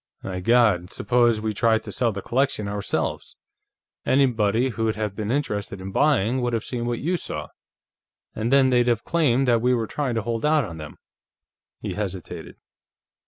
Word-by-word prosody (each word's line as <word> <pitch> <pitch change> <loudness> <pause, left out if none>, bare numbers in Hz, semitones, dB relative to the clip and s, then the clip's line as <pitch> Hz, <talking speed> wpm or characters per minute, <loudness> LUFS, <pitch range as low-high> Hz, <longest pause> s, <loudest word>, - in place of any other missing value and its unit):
My 95 -1 -4
God, 105 -4 +3
suppose 120 +1 +2
we'd 110 -1 -3
tried 115 -2 +2
to 105 - -7
sell 115 +4 +1
the 100 -1 -6
collection 130 -4 0
ourselves! 100 0 -3 0.7
Anybody 120 -3 +2
who'd 110 -2 -1
have 105 -2 -3
been 105 0 -4
interested 105 -8 -2
in 95 +1 -6
buying 130 -1 +2
would 120 -1 -1
have 115 - -1
seen 120 -2 -4
what 120 -1 -1
you 175 +7 -1
saw, - - -6 0.8
and 115 +3 -2
then 135 -1 +5
they'd 120 -1 +3
have 120 -2 +1
claimed 135 -6 +2
that 120 -2 +3
we 125 +1 +3
were 115 -2 -1
trying 130 +1 -2
to 115 - -1
hold 115 0 -3
out 150 -3 +3
on 85 -5 -8
them." 75 -2 -9 0.9
He - - -4
hesitated. 95 -4 -6
115 Hz, 175 wpm, -24 LUFS, 105-125 Hz, 0.9 s, then